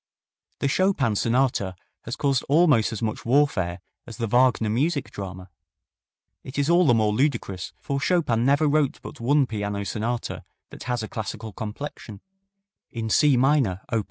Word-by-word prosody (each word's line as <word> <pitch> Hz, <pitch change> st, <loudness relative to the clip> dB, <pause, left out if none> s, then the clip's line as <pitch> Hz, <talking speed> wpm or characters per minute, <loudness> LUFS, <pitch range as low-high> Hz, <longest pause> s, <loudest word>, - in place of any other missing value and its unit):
The -, -, +2 dB
Chopin 140 Hz, -, +1 dB
sonata 115 Hz, -5 st, +1 dB, 0.3 s
has 115 Hz, -, -4 dB
caused 135 Hz, -3 st, +1 dB
almost 145 Hz, -8 st, +4 dB
as 110 Hz, 0 st, -5 dB
much 110 Hz, -1 st, -3 dB
warfare 115 Hz, -10 st, +1 dB, 0.3 s
as 115 Hz, -, -9 dB
the 115 Hz, -, -1 dB
Wagner 120 Hz, 0 st, +3 dB
music 140 Hz, +6 st, 0 dB
drama. 95 Hz, -2 st, -8 dB, 0.9 s
It 130 Hz, -, -9 dB
is 145 Hz, +3 st, +2 dB
all 175 Hz, -1 st, +5 dB
the 120 Hz, -, +5 dB
more 110 Hz, -2 st, +2 dB
ludicrous, 105 Hz, -7 st, -1 dB
for 140 Hz, 0 st, -3 dB
Chopin 150 Hz, -10 st, +1 dB
never 140 Hz, +4 st, +3 dB
wrote 145 Hz, -1 st, +1 dB
but -, -, -9 dB
one 140 Hz, +4 st, +3 dB
piano 105 Hz, -3 st, -3 dB
sonata 115 Hz, +4 st, -3 dB, 0.3 s
that -, -, -10 dB
has 125 Hz, -2 st, -2 dB
a -, -, -4 dB
classical 110 Hz, 0 st, -6 dB
complexion: 110 Hz, -1 st, -7 dB, 0.7 s
in 110 Hz, -1 st, -4 dB
C 145 Hz, 0 st, +4 dB
minor, 130 Hz, -8 st, +2 dB
op. 115 Hz, -, +2 dB
120 Hz, 155 wpm, -24 LUFS, 110-140 Hz, 0.9 s, all